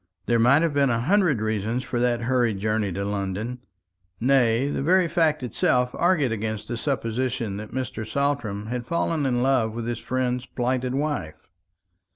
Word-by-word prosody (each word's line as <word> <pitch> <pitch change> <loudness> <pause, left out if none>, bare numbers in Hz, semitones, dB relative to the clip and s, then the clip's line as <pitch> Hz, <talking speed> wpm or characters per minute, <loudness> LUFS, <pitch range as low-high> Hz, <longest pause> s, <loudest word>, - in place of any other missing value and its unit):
There 120 -1 +2
might 135 +7 +5
have 165 -3 +1
been 140 -1 +3
a 115 -1 +1
hundred 170 - +2
reasons 110 +3 -1
for 120 - -3
that 120 -1 +1
hurried 120 -3 +1
journey 105 0 0
to 100 +2 -3
London 100 +4 -3 0.6
nay, 125 0 +3
the 145 - -2
very 180 +4 +3
fact 155 -3 +1
itself 125 +1 +1
argued 165 -8 +2
against 110 -1 -3
the 120 - -3
supposition 115 -4 -2
that 105 +1 -7
Mr. 130 -3 -4
Saltram 110 -4 -1
had 120 +1 -4
fallen 165 -3 0
in 125 -1 +1
love 130 -5 +2
with 115 0 -4
his 120 -1 -3
friend's 125 +1 -2
plighted 125 +1 -1
wife. 140 - -3
125 Hz, 170 wpm, -24 LUFS, 110-135 Hz, 0.6 s, might